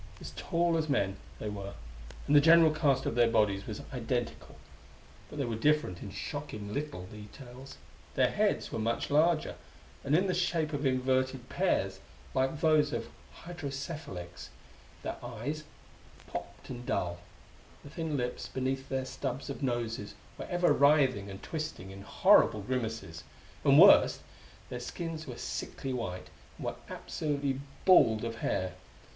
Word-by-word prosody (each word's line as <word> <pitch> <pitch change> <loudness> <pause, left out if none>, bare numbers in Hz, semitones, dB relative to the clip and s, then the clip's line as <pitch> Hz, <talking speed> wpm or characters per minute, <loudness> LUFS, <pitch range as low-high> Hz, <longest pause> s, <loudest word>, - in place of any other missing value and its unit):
As - - -8
tall 170 -1 +1
as 155 -1 -2
men, 100 -8 +1 0.2
they - - -5
were, 100 -1 -5 0.5
and 145 - +3
the 145 - +9
general 165 +1 +7
cast 145 -4 +2
of - - 0
their 120 -1 +4
bodies 100 -3 +2
was 105 - -5
identical. 120 0 -3 0.7
But - - -9
they 140 - 0
were 115 -2 -2
different 145 -7 +1
in 100 - -6
shocking 105 0 -5
little 145 -10 -4
details. 120 - -11 0.4
Their - - +3
heads - - +1
were - - -3
much 115 +5 -1
larger, 155 +2 +3 0.5
and 140 +2 +2
in 185 +4 +4
the 185 - +1
shape 165 -3 0
of 145 -1 0
inverted 130 0 0
pears, - - 0 0.3
like 135 +3 0
those 155 -2 +4
of - - -3 0.4
hydrocephalics; 140 - -6 0.5
their - - -4
eyes, 125 +6 -5 0.6
popped - - -7
and 120 -1 -6
dull. 85 -7 -1 0.6
The 145 - -11
thin 160 -2 -2
lips 125 -1 -3
beneath 130 +1 -2
their 130 -1 -1
stubs 135 +1 -4
of 140 - -7
noses 115 -5 -2 0.2
were - - -6
ever 175 0 +3
writhing 135 -8 +4
and 95 0 -9
twisting 155 - -5
in 100 0 -9
horrible 105 +1 +4
grimaces. 115 -8 -3 0.4
And, - - +6
worst, - - +8 0.5
their 125 - -4
skins 160 +4 -5
were 125 -2 -7
sickly 135 -2 -4
white, 90 -7 -4 0.3
and - - -7
were - - -2
absolutely 140 -3 -2 0.2
bald 115 - +6
of 115 0 -4
hair. 95 -4 -1
130 Hz, 150 wpm, -31 LUFS, 110-150 Hz, 0.7 s, the